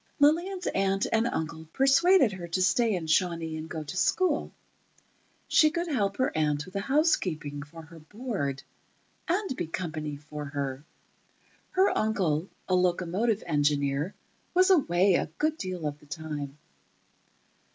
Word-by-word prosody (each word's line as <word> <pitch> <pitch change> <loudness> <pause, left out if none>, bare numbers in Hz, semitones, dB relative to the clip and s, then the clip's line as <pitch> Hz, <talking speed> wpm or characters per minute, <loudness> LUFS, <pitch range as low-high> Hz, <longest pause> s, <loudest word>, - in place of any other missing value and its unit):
Lillian's 345 +6 +2
aunt 195 0 +1
and 225 +1 +3
uncle 160 -4 -4
persuaded 275 - +5
her 180 -3 -7
to 170 +2 -1
stay 225 +2 +3
in 170 -3 -3
Shawnee 165 -1 +1
and 155 +1 -6
go 160 -2 -4
to 150 - -7
school. 310 - +1 1.0
She 310 - +5
could 340 +2 -2
help 205 -10 0
her 255 - 0
aunt 150 -1 0
with 185 - -13
the 200 - -1
housekeeping, 185 - 0
for 160 +3 -11
her 165 +1 -13
board, 160 - -4 0.6
and 370 -3 0
be 170 - -3
company 155 -3 -4
for 150 +1 -8
her. 140 -1 -4 0.9
Her 380 +1 +3
uncle, 185 -6 0 0.2
a 185 - 0
locomotive 185 +5 +1
engineer, 145 +1 0 0.4
was 370 +1 +5
away 195 - +4
a - - +1
good 310 +1 +1
deal 185 -4 -4
of 145 0 -3
the 150 - -20
time. 150 -2 -6
180 Hz, 145 wpm, -28 LUFS, 150-245 Hz, 1.0 s, persuaded